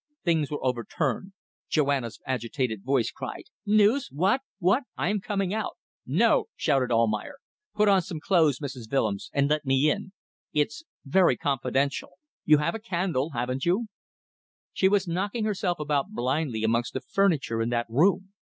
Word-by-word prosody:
Things 160 Hz, -5 st, +2 dB
were 145 Hz, -2 st, -4 dB
overturned. 130 Hz, -, -2 dB, 0.4 s
Joanna's 140 Hz, -6 st, 0 dB
agitated 125 Hz, -3 st, -2 dB
voice 130 Hz, -3 st, +1 dB
cried 130 Hz, -2 st, -7 dB, 0.2 s
"News! 215 Hz, +6 st, +4 dB
What? 190 Hz, -, +2 dB, 0.2 s
What? 205 Hz, +8 st, +2 dB
I -, -, 0 dB
am 210 Hz, 0 st, 0 dB
coming 195 Hz, -2 st, -1 dB
out." 220 Hz, -1 st, -2 dB, 0.3 s
"No," -, -, +3 dB
shouted 130 Hz, -3 st, +1 dB
Almayer. 115 Hz, -, +1 dB, 0.4 s
"Put 210 Hz, 0 st, +3 dB
on 195 Hz, -2 st, +5 dB
some 170 Hz, -2 st, -6 dB
clothes, 160 Hz, -6 st, +3 dB
Mrs. 130 Hz, -5 st, -7 dB
Willems, 110 Hz, -8 st, 0 dB
and 140 Hz, 0 st, +2 dB
let 150 Hz, +1 st, +1 dB
me 135 Hz, +2 st, +3 dB
in. 205 Hz, -1 st, -4 dB, 0.4 s
It's... 150 Hz, -, 0 dB, 0.2 s
very 180 Hz, +6 st, +4 dB
confidential. 140 Hz, +1 st, -1 dB, 0.3 s
You 155 Hz, -1 st, +6 dB
have 150 Hz, +3 st, 0 dB
a 225 Hz, -, -4 dB
candle, 175 Hz, -, -1 dB
haven't 125 Hz, +2 st, -2 dB
you?" 205 Hz, +6 st, +1 dB, 0.8 s
She 190 Hz, -, +3 dB
was 200 Hz, -2 st, +2 dB
knocking 200 Hz, +6 st, -1 dB
herself 190 Hz, -5 st, -1 dB
about 150 Hz, +2 st, 0 dB
blindly 130 Hz, -, -1 dB
amongst 115 Hz, +2 st, +1 dB
the 130 Hz, -, -3 dB
furniture 145 Hz, -9 st, +1 dB
in 115 Hz, -, 0 dB
that 120 Hz, -1 st, 0 dB
room. 185 Hz, -, +2 dB
150 Hz, 155 wpm, -27 LUFS, 130-190 Hz, 0.8 s, You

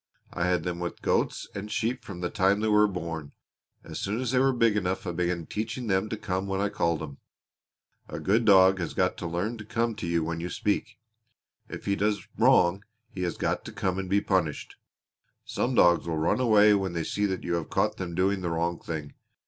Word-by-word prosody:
I 85 Hz, +1 st, 0 dB
had 90 Hz, -3 st, +1 dB
them 85 Hz, 0 st, -3 dB
with 85 Hz, 0 st, -5 dB
goats -, -, 0 dB
and 100 Hz, +2 st, -6 dB
sheep 120 Hz, +3 st, -1 dB
from 90 Hz, -3 st, -8 dB
the 90 Hz, -, -2 dB
time 100 Hz, 0 st, +2 dB
they 110 Hz, -, +1 dB
were 105 Hz, 0 st, +5 dB
born. 85 Hz, -6 st, -5 dB, 0.5 s
As -, -, -7 dB
soon 105 Hz, +4 st, -2 dB
as 125 Hz, -2 st, -1 dB
they 130 Hz, -, +3 dB
were 135 Hz, +1 st, +4 dB
big 115 Hz, -4 st, +2 dB
enough 95 Hz, 0 st, -1 dB
I 90 Hz, -, -2 dB
began 85 Hz, -1 st, -1 dB
teaching 110 Hz, +6 st, -4 dB
them 95 Hz, 0 st, 0 dB
to 110 Hz, -, -3 dB
come 95 Hz, -2 st, -3 dB
when 95 Hz, 0 st, -1 dB
I 100 Hz, +1 st, +1 dB
called 85 Hz, -4 st, 0 dB
'em. 70 Hz, -3 st, -8 dB, 0.9 s
A -, -, -5 dB
good 110 Hz, +5 st, +2 dB
dog 95 Hz, -2 st, +6 dB
has 85 Hz, -, -4 dB
got -, -, +1 dB
to 85 Hz, -, -4 dB
learn 95 Hz, +8 st, -2 dB
to -, -, -6 dB
come 115 Hz, +2 st, -1 dB
to -, -, -4 dB
you 85 Hz, -1 st, +1 dB
when 85 Hz, +1 st, -3 dB
you 85 Hz, +2 st, -4 dB
speak. 105 Hz, 0 st, -2 dB, 0.7 s
If -, -, -8 dB
he 100 Hz, -, +1 dB
has 105 Hz, +1 st, +2 dB
done -, -, -13 dB
wrong 90 Hz, +3 st, +4 dB, 0.3 s
he 90 Hz, -, -6 dB
has 90 Hz, -1 st, -2 dB
got -, -, -1 dB
to -, -, -7 dB
come 95 Hz, -1 st, -2 dB
and 95 Hz, -1 st, -4 dB
be 100 Hz, +1 st, +3 dB
punished. 90 Hz, -8 st, -1 dB, 0.7 s
Some 125 Hz, +1 st, -1 dB
dogs 85 Hz, -5 st, +4 dB
will 80 Hz, -1 st, -1 dB
run 80 Hz, +9 st, +1 dB
away 105 Hz, -4 st, +5 dB
when 95 Hz, -3 st, 0 dB
they 85 Hz, -1 st, -2 dB
see 105 Hz, +5 st, 0 dB
that 95 Hz, -1 st, -3 dB
you 85 Hz, -, -2 dB
have 85 Hz, -2 st, -2 dB
caught -, -, 0 dB
them 85 Hz, -3 st, -5 dB
doing 95 Hz, +2 st, +1 dB
the 90 Hz, -, -2 dB
wrong 85 Hz, +1 st, -1 dB
thing. 75 Hz, -3 st, -6 dB
95 Hz, 230 wpm, -27 LUFS, 85-105 Hz, 0.9 s, dog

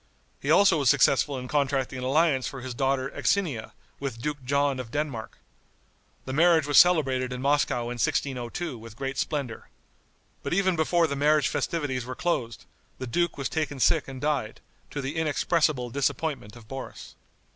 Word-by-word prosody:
He -, -, -4 dB
also 190 Hz, -5 st, +5 dB
was 140 Hz, -4 st, +3 dB
successful 140 Hz, +1 st, +3 dB
in 125 Hz, 0 st, -6 dB
contracting 135 Hz, -2 st, 0 dB
an -, -, -5 dB
alliance 140 Hz, 0 st, +2 dB
for 135 Hz, -, -7 dB
his 130 Hz, 0 st, -5 dB
daughter 135 Hz, +1 st, 0 dB
Axinia, 145 Hz, -, -1 dB, 0.3 s
with 135 Hz, -5 st, -4 dB
Duke 145 Hz, +2 st, -4 dB
John 140 Hz, 0 st, +1 dB
of 125 Hz, -3 st, -6 dB
Denmark. 135 Hz, -5 st, -4 dB, 0.9 s
The 130 Hz, -, -4 dB
marriage 165 Hz, 0 st, +4 dB
was 145 Hz, -1 st, +6 dB
celebrated 135 Hz, -8 st, +3 dB
in 125 Hz, -, -4 dB
Moscow 140 Hz, -2 st, +1 dB
in 120 Hz, 0 st, -4 dB
1602 130 Hz, +2 st, -2 dB
with 115 Hz, -1 st, -11 dB
great 135 Hz, +1 st, -4 dB
splendor. 140 Hz, -7 st, -3 dB, 0.7 s
But -, -, -2 dB
even 190 Hz, -2 st, +2 dB
before 165 Hz, +2 st, +2 dB
the 140 Hz, -3 st, -2 dB
marriage 150 Hz, +1 st, +3 dB
festivities 145 Hz, -7 st, -2 dB
were 130 Hz, +1 st, -6 dB
closed, 120 Hz, -10 st, -2 dB, 0.3 s
the 130 Hz, -, -5 dB
duke 170 Hz, +7 st, 0 dB
was 140 Hz, -, -2 dB
taken 150 Hz, -3 st, -3 dB
sick -, -, +3 dB
and 135 Hz, -1 st, -7 dB
died, 140 Hz, -7 st, -1 dB, 0.3 s
to 145 Hz, -, -4 dB
the 135 Hz, +3 st, -4 dB
inexpressible 150 Hz, -4 st, +1 dB
disappointment 140 Hz, -3 st, -2 dB
of 115 Hz, -2 st, -14 dB
Boris. 135 Hz, +1 st, -8 dB
140 Hz, 170 wpm, -26 LUFS, 125-150 Hz, 0.9 s, was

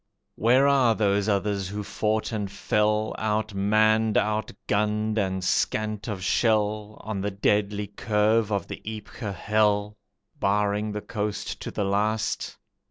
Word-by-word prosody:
Where 125 Hz, +5 st, +4 dB
are 130 Hz, -5 st, +4 dB
those 100 Hz, -1 st, +1 dB
others 100 Hz, -1 st, 0 dB
who 105 Hz, +1 st, -4 dB
fought 110 Hz, +3 st, -1 dB
and 105 Hz, -3 st, -2 dB
fell, 105 Hz, +2 st, 0 dB
Outmanned, 110 Hz, +1 st, +2 dB
outgunned 105 Hz, 0 st, 0 dB
and 95 Hz, -2 st, -1 dB
scant 110 Hz, +3 st, 0 dB
of 100 Hz, -4 st, -4 dB
shell, 105 Hz, -1 st, +1 dB
On 105 Hz, -3 st, -4 dB
the 100 Hz, -, -1 dB
deadly 105 Hz, +1 st, 0 dB
curve 105 Hz, +1 st, +1 dB
of 100 Hz, -4 st, -1 dB
the -, -, -7 dB
Ypres 110 Hz, -1 st, -6 dB
hell, 105 Hz, +1 st, +1 dB, 0.4 s
Barring 105 Hz, +1 st, +1 dB
the 105 Hz, -, -3 dB
coast 105 Hz, 0 st, -4 dB
to -, -, -4 dB
the 100 Hz, -, -2 dB
last? 105 Hz, +2 st, -1 dB
105 Hz, 130 wpm, -26 LUFS, 100-110 Hz, 0.4 s, Where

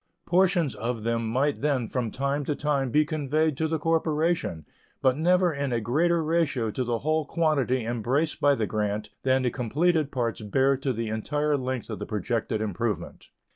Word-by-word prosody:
Portions 175 Hz, -4 st, +2 dB
of 115 Hz, -1 st, -3 dB
them 115 Hz, 0 st, 0 dB
might 135 Hz, +5 st, 0 dB
then 135 Hz, -5 st, +1 dB
from 125 Hz, -2 st, -2 dB
time 140 Hz, +4 st, -1 dB
to 150 Hz, -, -1 dB
time 140 Hz, -3 st, 0 dB
be 150 Hz, +5 st, +3 dB
conveyed 155 Hz, 0 st, 0 dB
to 160 Hz, -, 0 dB
the 160 Hz, 0 st, 0 dB
corporation, 160 Hz, -, 0 dB, 0.3 s
but 130 Hz, -1 st, +3 dB
never 180 Hz, +3 st, +3 dB
in 140 Hz, -2 st, -2 dB
a 120 Hz, -, +1 dB
greater 160 Hz, +9 st, +1 dB
ratio 155 Hz, -8 st, 0 dB
to 130 Hz, -, -2 dB
the 120 Hz, -1 st, -1 dB
whole 155 Hz, +5 st, 0 dB
quantity 140 Hz, -6 st, 0 dB
embraced 120 Hz, +7 st, -1 dB
by 145 Hz, -1 st, +5 dB
the 110 Hz, -, -1 dB
grant 105 Hz, 0 st, -2 dB
than 130 Hz, 0 st, +2 dB
the 125 Hz, -, +1 dB
completed 150 Hz, +6 st, +1 dB
parts 120 Hz, -3 st, -2 dB
bear 135 Hz, +6 st, +2 dB
to 135 Hz, 0 st, -1 dB
the 115 Hz, -2 st, -3 dB
entire 145 Hz, +7 st, 0 dB
length 130 Hz, -3 st, -3 dB
of 105 Hz, -, -5 dB
the -, -, -5 dB
projected 110 Hz, +1 st, -2 dB
improvement. 110 Hz, +1 st, -3 dB
135 Hz, 180 wpm, -26 LUFS, 115-155 Hz, 0.3 s, by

